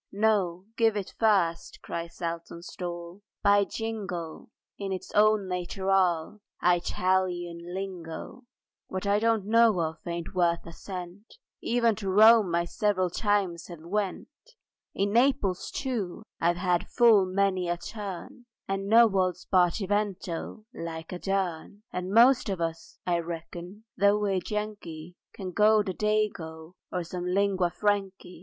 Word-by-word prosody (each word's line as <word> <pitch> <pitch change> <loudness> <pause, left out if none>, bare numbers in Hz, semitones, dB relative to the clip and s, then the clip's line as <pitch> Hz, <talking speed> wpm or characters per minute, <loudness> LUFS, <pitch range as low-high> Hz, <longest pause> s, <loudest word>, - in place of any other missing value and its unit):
"No, 195 -4 +1
give 225 -2 +3
it 195 -2 -5
first," 190 -7 +2
cried 170 0 -5
Saltonstall, 170 +1 -6 0.2
"by 200 0 +5
jingo! 195 -8 -5 0.3
In 195 -1 -3
its 185 -2 -5
own 210 -1 +4
nateral, 185 0 0 0.2
Eyetalian 180 0 +1 0.2
lingo; 190 +4 -6 0.4
What 185 +1 -4
I 200 +1 +3
don't 225 -2 +1
know 225 -2 +4
of 160 -1 -1
it - - -6
ain't 170 +2 -4
worth 170 -2 +1
a 170 - -9
cent; 185 - -8 0.3
Even 235 -1 +2
to 200 -3 -3
Rome 210 -2 +6
I 170 0 +1
several 185 -1 0
times 195 -5 0
have 170 -3 -10
went, 195 +2 -2 0.7
In 200 +1 0
Naples, 235 -7 +2
too, 220 -8 -3 0.2
I've 170 +1 +2
had 180 -1 0
full 225 -6 +5
many 185 -1 +1
a 175 - 0
turn 205 +4 -8 0.2
And 195 0 -2
know 230 +3 +7
old 190 -5 +2
Spartivento 190 +1 -1
like 160 -1 -6
a 180 - -5
dern; 195 +1 -2
And 180 0 -3
most 235 +2 +5
of 190 -3 -2
us, 165 -1 -4
I 175 -1 +1
reckon—though 180 +5 -2
we're 200 -3 0
Yankee— 180 -6 -5 0.2
Can 185 -3 -5
go 210 +2 +4
the 190 -2 -3
Dago, 180 -6 -2 0.2
or 180 -1 -2
some 175 +1 -5
lingua 190 -1 +2
frankey. 195 -3 -2
190 Hz, 135 wpm, -28 LUFS, 175-210 Hz, 0.7 s, know